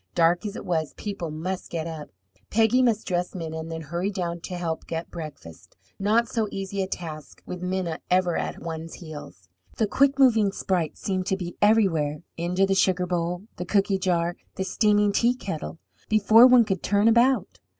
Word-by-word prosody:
Dark 175 +4 +3
as 205 - -6
it - - -7
was, 160 -4 -1
people 195 -5 -4
must 175 +5 -4
get 165 -2 -3
up. 160 -3 -7 0.4
Peggy 225 +3 +3
must 230 -4 +2
dress 180 0 -2
Minna 160 -2 -5
and 160 +1 -6
then 160 0 -5
hurry 170 +5 -2
down 175 -4 -3
to 185 - -5
help 165 -2 -4
get 165 0 -5
breakfast 150 - -10 0.2
not 220 +4 +2
so 225 -2 -1
easy 195 0 -3
a 190 - -1
task 155 -5 -7
with 180 -1 -6
Minna 180 -3 -2
ever 180 -1 +2
at - - -3
one's 165 0 -6
heels. 145 - -10 0.3
The 220 - +2
quick 275 +6 +2
moving 225 -7 +4
sprite 180 -5 -1
seemed 185 -1 -2
to 190 - +1
be 175 -2 -6
everywhere 170 -8 +2
into 180 +3 +1
the 195 - +1
sugar 185 -1 +2
bowl, 175 +1 -2
the 180 - -4
cooky 195 +1 +1
jar, 175 -2 0 0.2
the 190 - -2
steaming 205 +2 +2
teakettle 200 -9 -1 0.3
before 215 +3 +7
one 250 -2 +6
could 195 -4 -2
turn 205 +2 +2
about. 235 -2 +3
185 Hz, 180 wpm, -25 LUFS, 165-205 Hz, 0.4 s, before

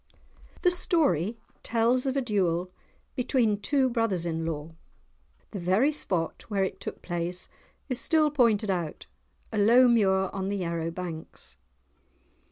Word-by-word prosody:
The 360 - +5
story 240 - +1 0.2
tells 240 +3 +1
of 265 +1 0
a 270 - +1
duel 180 -5 0 0.4
between 235 -5 +1
two 270 +5 +2
brothers 225 -8 0
in 165 -1 -2
law. 160 0 -5 0.8
The 200 - -5
very 190 - +2
spot 180 - -3
where 200 -3 0
it 190 - -3
took - - -7
place 175 +1 -3 0.4
is 255 -2 0
still 310 -2 +3
pointed 225 -7 +2
out, 170 -4 -3 0.5
a 215 - -1
low 240 +5 +6
muir 190 -5 +3
on 195 0 -3
the 200 - -1
Yarrow 170 -2 -2
banks. 165 -2 -8
200 Hz, 140 wpm, -27 LUFS, 175-245 Hz, 0.8 s, low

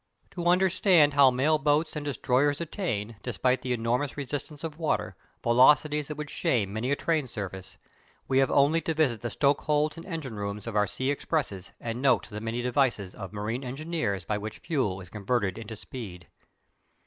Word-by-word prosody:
To 175 -1 -3
understand 180 -4 +4
how 140 -2 +7
mail 145 +5 +2
boats 150 +3 +1
and 150 - -3
"destroyers" 140 +1 +1
attain, 115 - -3
despite 125 +2 0
the 125 - -3
enormous 125 +5 -1
resistance 145 +2 -5
of 160 -1 -5
water, 160 - -1 0.3
velocities 145 +5 +4
that 150 - -5
would 150 -1 -5
shame 100 -6 0
many 110 +4 -2
a 140 - +3
train 155 -3 0
service, 95 -5 -7 0.5
we 135 0 +3
have 135 - +3
only 150 +4 +4
to 165 - -2
visit 130 -8 +1
the 120 - -3
stokeholds 150 +3 +1
and 165 - -9
engine 155 - -5
rooms 100 0 -4
of 115 -2 -5
our 105 -1 +3
sea 130 +8 -1
expresses 135 - -2
and 115 +1 -4
note 135 - +3
the 105 +1 -5
many 115 +2 -3
devices 120 -7 +1
of 95 -3 -8
marine 110 +5 -3
engineers 130 - -3
by 105 +2 -1
which 110 +1 -6
fuel 130 - -1
is 90 - -12
converted 100 -2 -1
into 110 0 -7
speed. 100 -6 -8
130 Hz, 180 wpm, -28 LUFS, 110-150 Hz, 0.5 s, how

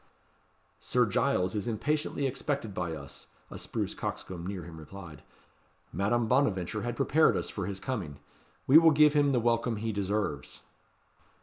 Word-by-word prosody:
"Sir - - +2
Giles 90 0 +1
is 105 0 -3
impatiently 145 +5 -1
expected 135 -4 -2
by 85 -3 -3
us," 70 -2 -10 0.2
a - - -7
spruce - - -3
coxcomb 90 -1 -5
near 95 -2 -4
him 85 -2 -10
replied. 85 -1 -10 0.7
"Madame 110 +5 +1
Bonaventure 110 -6 +1
had 120 +2 -3
prepared 155 +3 +3
us - - -3
for 100 -3 -4
his 100 -1 -4
coming. 95 - -4 0.5
We 145 +5 +8
will 165 0 +6
give 150 -1 +5
him 145 -2 +3
the 125 - +2
welcome 115 0 +1
he 110 +2 -2
deserves." 100 -8 -2
110 Hz, 150 wpm, -29 LUFS, 90-135 Hz, 0.7 s, We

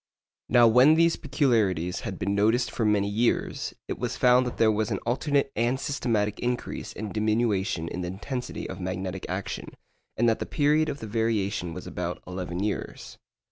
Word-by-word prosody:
Now 120 -1 +6
when 125 +7 +6
these 165 0 +4
peculiarities 110 - +1
had - - -5
been 100 +3 -1
noticed 110 +5 +2
for 115 - -2
many 105 -1 +2
years, 110 +4 0
it - - -4
was - - -3
found 125 0 +4
that 125 - -5
there 110 -1 +4
was 110 0 0
an - - -1
alternate 140 +3 +1
and 120 +4 +1
systematic 110 -8 -1
increase 125 0 -3
and 105 -1 -6
diminution 105 -6 0
in 90 - -4
the 90 - -3
intensity 125 +8 -5
of - - -7
magnetic 95 0 -4
action, - - -5 0.4
and 120 - +3
that 115 - +2
the - - -4
period 150 +2 +2
of 140 - -5
the 110 - -5
variation 105 -5 -1
was - - -7
about 90 0 -4
eleven 90 0 -4
years. 105 -1 -4
110 Hz, 180 wpm, -27 LUFS, 100-125 Hz, 0.4 s, Now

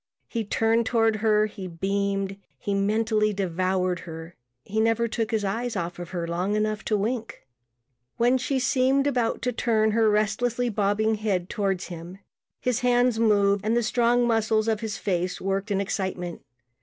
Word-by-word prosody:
He 230 -2 -2
turned 225 +2 +1
toward 225 -2 +2
her; 215 -1 +3
he 200 -3 -7
beamed; 195 +2 -2 0.2
he 200 - -3
mentally 215 +1 +1
devoured 185 -1 0
her; 165 0 -9 0.3
he 215 +2 -3
never 225 +1 +2
took 225 -1 -2
his 220 -3 0
eyes 230 +4 -2
off 175 -1 -3
her 175 -1 -4
long 180 +5 -1
enough 215 0 -1
to 215 - +1
wink. 230 +2 -3 0.7
When 245 +2 +3
she 265 +2 -1
seemed 260 +2 +2
about 245 -5 0
to 250 - +1
turn 220 -2 +1
her 220 0 +3
restlessly 220 +4 +1
bobbing 210 +1 +1
head 185 -5 -1
toward 195 -4 -1
him, 175 +1 -8 0.4
his 250 -2 0
hands 245 -2 +2
moved 200 -3 +3
and 220 +3 +1
the 240 - +2
strong 240 +1 +2
muscles 220 -1 +1
of 220 -2 +1
his 215 -3 -4
face 180 -2 -1
worked 195 +2 -2
in 200 -1 +1
excitement. 190 -3 -3
215 Hz, 165 wpm, -25 LUFS, 195-230 Hz, 0.7 s, her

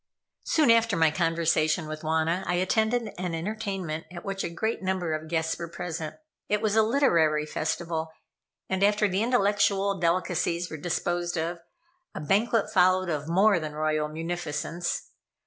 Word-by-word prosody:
Soon 305 -7 +4
after 230 -2 +3
my 160 -1 +4
conversation 165 0 +1
with 155 0 -6
Wauna, 160 +3 0
I 180 - +1
attended 220 +5 +1
an 180 -2 -2
entertainment 190 -3 -4
at 175 -1 -9
which 195 -1 -3
a - - -2
great 220 +7 -2
number 185 -4 -1
of 155 0 -4
guests 160 0 -1
were 170 - -4
present. 165 -2 -5 0.3
It 210 - +2
was 215 0 0
a 220 - +6
literary 170 - +3
festival 160 +1 -3 0.6
and, 190 0 -1
after 210 +1 +3
the 190 +1 0
intellectual 205 -4 +2
delicacies 175 0 0
were 160 - -5
disposed 175 +2 -2
of, 170 +2 -2 0.6
a - - -4
banquet 210 +8 +1
followed 185 -1 +3
of 150 -2 -2
more 195 +2 +4
than 155 -2 -5
royal 155 0 0
munificence. 165 +1 -4
175 Hz, 155 wpm, -27 LUFS, 160-200 Hz, 0.6 s, a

